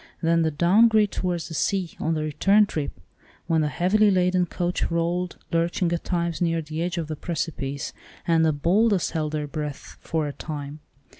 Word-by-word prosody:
Then 165 0 +3
the 160 - +2
down 180 +9 +5
grade 215 -2 +3
towards 175 -2 -2
the 165 - -8
sea, 190 +1 -1
on 160 +1 0
the 155 - -1
return 195 +8 +4
trip, 150 - -4 0.5
when 160 -1 +2
the 150 - +1
heavily 190 +8 +3
laden 180 -1 +2
coach 175 0 -1
rolled, 170 +2 -1
lurching 170 +1 +1
at 170 - -2
times 170 -2 -2
near 165 -1 +1
the 155 0 -5
edge 175 0 -2
of 165 -2 -2
the 155 - -4
precipice, 145 -4 -4 0.3
and 165 -1 +4
the 160 - +4
"boldest 185 +6 +2
held 155 -1 -2
their 150 -1 -1
breath 150 -1 -6
for 160 -2 -1
a 145 - -5
time." 145 -1 -6
170 Hz, 190 wpm, -25 LUFS, 155-180 Hz, 0.5 s, down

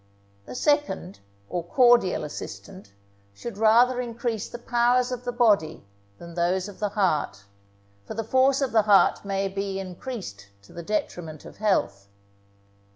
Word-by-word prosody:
The 125 - -8
second, 290 - 0 0.3
or 175 - -3
cordial 240 0 +3
assistant, 100 -7 -9 0.4
should 210 - -8
rather 240 +3 +4
increase 235 -2 -4
the - - -7
powers 245 +1 +1
of 250 0 -5
the 245 - -1
body 210 - +2 0.3
than 170 0 -11
those 180 +2 0
of 205 - -12
the 210 - -1
heart; 165 - 0 0.6
for - - -6
the 225 - -2
force 260 +4 +3
of 270 - 0
the 225 - +4
heart 205 -2 +4
may 195 0 -1
be 195 0 -4
increased 185 - -7 0.2
to - - -18
the 170 - -7
detriment 165 -5 -4
of - - -12
health. 100 - 0
205 Hz, 150 wpm, -25 LUFS, 170-240 Hz, 0.6 s, rather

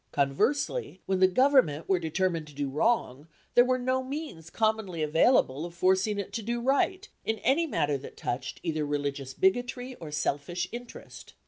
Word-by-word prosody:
Conversely, 265 - 0
when 190 -1 0
the 185 - +7
Government 220 - +3
were 190 -2 +2
determined 165 -1 -1
to 150 - -14
do 140 -1 -2
wrong, 150 - 0 0.3
there 245 - +7
were 255 0 +1
no 255 +1 0
means 260 - -6
commonly 215 -6 0
available 155 - +3
of 170 0 -7
forcing 190 +4 +2
it 200 - -5
to 230 - -2
do 235 +3 -2
right, 280 +11 +1 0.2
in 220 - -1
any 300 +7 +3
matter 145 - 0
that 135 - -11
touched 120 +3 -4
either 155 -3 -1
religious 140 -2 -3
bigotry 245 +6 0
or 160 - -7
selfish 150 +3 -2
interest. 240 0 -10
185 Hz, 165 wpm, -28 LUFS, 150-245 Hz, 0.3 s, the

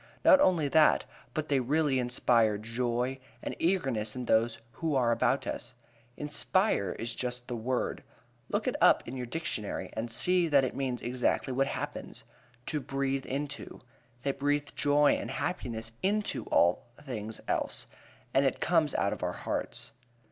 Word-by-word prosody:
Not 280 - +8
only 170 - +3
that, 155 +2 +4 0.3
but 155 -1 -1
they 140 -2 +2
really 140 +1 +1
inspire 120 -3 +3
joy 120 +4 -2 0.2
and - - -4
eagerness 135 - +1
in 125 -1 -4
those 115 0 +2
who 160 +1 -2
are 120 -3 +3
about 115 - +1
us. - - -5 0.4
Inspire 150 - +1
is 115 0 -2
just 125 -1 -3
the 125 - -3
word. 125 +2 -2 0.5
Look - - -1
it - - 0
up - - +5
in 120 - -5
your 125 -2 -4
dictionary 145 -7 -3
and 115 +2 -3
see 180 +9 +3
that 140 -3 +4
it 130 - -2
means 130 -3 -2
exactly 125 +1 0
what 135 +2 +2
happens - - -5 0.4
to 150 - -1
breathe 135 -1 -2
into 140 +1 -4 0.4
they 140 - +1
breathe 145 +1 0
joy 145 0 +4
and - - -3
happiness 115 -10 -3
into 205 +2 0
all 85 +7 +2
things 110 -6 -5
else, - - -1 0.5
and 135 - +4
it 135 - +1
comes 160 -4 +2
out - - +1
of - - -8
our - - -1
hearts. - - -3
130 Hz, 160 wpm, -30 LUFS, 120-150 Hz, 0.5 s, Not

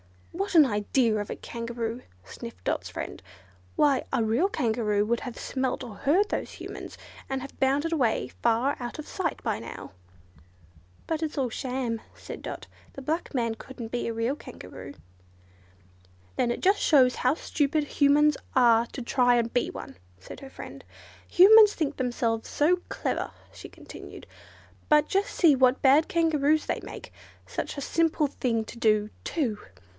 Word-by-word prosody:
"What 390 +2 -3
an 310 -3 +8
idea 220 +1 +1
of 205 -1 -4
a - - -3
Kangaroo!" 235 0 -5 0.2
sniffed 95 0 -10
Dot's - - -2
friend, - - -6 0.5
"why, 280 -3 +3
a 255 -4 +1
real 235 - +2
Kangaroo 220 - 0
would 235 +2 0
have 245 -3 -7
smelt 260 -1 -2
or 235 -4 -8
heard 360 - +2
those - - -3
Humans, - - -8 0.3
and 265 -1 -2
have 275 - -10
bounded 285 +5 +1
away 250 -8 +1
far 235 +4 +2
out 240 -1 -6
of 305 - -8
sight 345 -5 -3
by - - -1
now." 115 - -9 1.1
"But 320 -1 -2
it's 315 -1 -3
all 260 -4 0
sham," 250 -3 -3
said - - -9
Dot; - - -6 0.3
"the 275 - -9
black 315 +1 -2
man 230 -3 0
couldn't 240 -2 -9
be 240 +1 -2
a 230 - -2
real 230 +4 -1
Kangaroo." 85 - -10 1.4
"Then 240 - +1
it 240 - -2
just 395 +2 +3
shows 260 -5 +4
how 255 +4 +2
stupid 300 -1 0
Humans 290 +1 +3 0.2
are 235 -2 +5
to 260 - -7
try 245 0 +3
and 235 -1 0
be 245 - +1
one," - - -8 0.2
said - - -10
her 270 - -10
friend. - - -10 0.4
Humans 420 +3 +8
think 295 -3 -2
themselves 240 -3 -1
so 355 +5 +2
clever," - - -2 0.2
she - - -10
continued, - - -11 0.6
"but 300 0 +5
just 395 +1 0
see 320 -6 +4
what 255 0 +3
bad 285 +4 +5
Kangaroos 315 -4 +2
they - - -2
make—such - - -8
a - - -3
simple 325 +1 +1
thing 235 -5 -1
to 235 - -10
do, 215 -2 +2
too! 240 -11 -1
265 Hz, 160 wpm, -27 LUFS, 230-300 Hz, 1.4 s, an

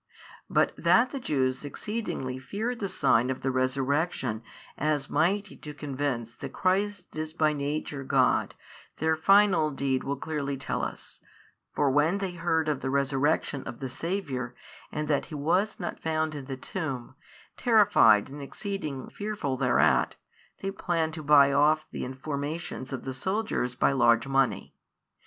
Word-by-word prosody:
But - - +2
that 245 +2 +4
the 275 - -4
Jews 130 - 0
exceedingly 145 - -4
feared 220 - -3
the 200 - -2
sign 120 -5 +2
of 130 - -3
the 135 - 0
resurrection 130 -2 0 0.3
as 150 -2 -1
mighty 190 +7 +1
to 150 -1 -9
convince 135 -5 -3
that 135 +2 -8
Christ 190 -1 0
is 155 0 -4
by 155 -2 +2
Nature 145 -1 -3
God, 130 -1 +2 0.4
their 160 +1 +2
final 195 -1 +4
deed 135 -2 -1
will 140 - -2
clearly 140 -1 -3
tell 135 - -3
us, - - -6 0.6
for 145 -2 +2
when 150 +7 +3
they 195 -2 -3
heard 165 -2 0
of 150 -3 -1
the 130 - -2
Resurrection 140 +1 +1
of 115 - -7
the 135 - -4
Saviour, 130 -6 -3 0.4
and 150 0 -3
that 145 -2 0
He 155 - -7
was 180 +9 +1
not - - -4
found 155 -1 -1
in 145 -3 -6
the 135 -1 -5
tomb, 130 -5 -5 0.4
terrified 205 - +5
and 140 +2 -9
exceeding 150 -3 -5
fearful 205 -10 -3
thereat, 80 - +3 0.5
they 195 - -1
planned 165 -4 -1
to 160 - -6
buy 140 -2 +6
off 155 +2 +3
the - - -4
informations 140 +1 -4
of 130 -2 -4
the 130 - -3
soldiers 190 - -1
by 130 - +3
large 120 -3 +4
money. 135 -7 +1
145 Hz, 155 wpm, -28 LUFS, 130-170 Hz, 0.6 s, buy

